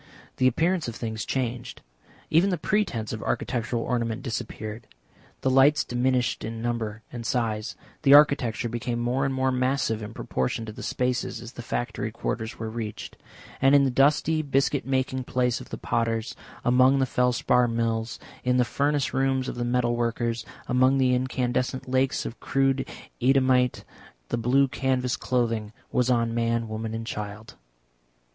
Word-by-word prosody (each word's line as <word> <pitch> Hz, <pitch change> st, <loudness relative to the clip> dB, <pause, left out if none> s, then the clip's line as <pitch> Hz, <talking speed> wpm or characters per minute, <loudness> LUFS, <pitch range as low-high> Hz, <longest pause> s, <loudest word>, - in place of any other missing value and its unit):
The 130 Hz, -, +4 dB
appearance 165 Hz, +6 st, +1 dB
of 120 Hz, -, -5 dB
things 110 Hz, -2 st, -4 dB
changed. 125 Hz, -2 st, -3 dB, 0.5 s
Even 170 Hz, +5 st, +4 dB
the 180 Hz, -, 0 dB
pretence 155 Hz, -, -1 dB
of 110 Hz, -, -5 dB
architectural 120 Hz, -1 st, -1 dB
ornament 115 Hz, -1 st, -2 dB
disappeared, 110 Hz, -2 st, -5 dB, 0.5 s
the 135 Hz, -, +1 dB
lights 140 Hz, +4 st, +5 dB
diminished 125 Hz, 0 st, 0 dB
in 115 Hz, +1 st, -5 dB
number 115 Hz, -2 st, -3 dB
and 120 Hz, -1 st, -5 dB
size, 110 Hz, -2 st, -1 dB, 0.3 s
the 140 Hz, -2 st, +7 dB
architecture 130 Hz, -6 st, +4 dB
became 120 Hz, +1 st, -3 dB
more 125 Hz, +3 st, 0 dB
and 135 Hz, -, 0 dB
more 130 Hz, 0 st, +1 dB
massive 125 Hz, -3 st, 0 dB
in 105 Hz, +2 st, -7 dB
proportion 65 Hz, -, -2 dB
to 110 Hz, -, -6 dB
the -, -, -10 dB
spaces 125 Hz, -2 st, -1 dB
as 115 Hz, 0 st, -9 dB
the 120 Hz, -, -8 dB
factory 115 Hz, -2 st, -3 dB
quarters 110 Hz, +1 st, -4 dB
were 110 Hz, -, -4 dB
reached. 110 Hz, -1 st, -6 dB, 0.5 s
And 135 Hz, +2 st, +6 dB
in 140 Hz, -, +6 dB
the 135 Hz, -, +2 dB
dusty 150 Hz, +4 st, +3 dB
biscuit 140 Hz, -1 st, 0 dB
making 130 Hz, -1 st, -1 dB
place 125 Hz, -2 st, 0 dB
of -, -, -11 dB
the -, -, -5 dB
potters, 115 Hz, -1 st, -1 dB, 0.3 s
among 130 Hz, +2 st, +5 dB
the 135 Hz, -, +2 dB
felspar 125 Hz, -1 st, +2 dB
mills, 115 Hz, -1 st, -1 dB, 0.3 s
in 125 Hz, 0 st, +2 dB
the 125 Hz, -, +4 dB
furnace 145 Hz, +2 st, 0 dB
rooms 130 Hz, 0 st, +1 dB
of -, -, -3 dB
the 120 Hz, -, -3 dB
metal 120 Hz, 0 st, +1 dB
workers, 115 Hz, -1 st, -1 dB, 0.2 s
among 130 Hz, +2 st, +3 dB
the 130 Hz, -1 st, +3 dB
incandescent 125 Hz, 0 st, -1 dB
lakes 130 Hz, +1 st, +1 dB
of 115 Hz, -, -6 dB
crude 135 Hz, 0 st, +1 dB, 0.3 s
Eadhamite, 130 Hz, -1 st, +3 dB, 0.5 s
the -, -, 0 dB
blue 130 Hz, +4 st, +3 dB
canvas 130 Hz, -1 st, 0 dB
clothing 115 Hz, -4 st, -1 dB, 0.2 s
was 125 Hz, 0 st, +1 dB
on 115 Hz, -2 st, +2 dB
man, 115 Hz, 0 st, 0 dB
woman 110 Hz, +1 st, -4 dB
and 115 Hz, 0 st, -4 dB
child. 105 Hz, 0 st, -6 dB
125 Hz, 160 wpm, -26 LUFS, 115-130 Hz, 0.5 s, the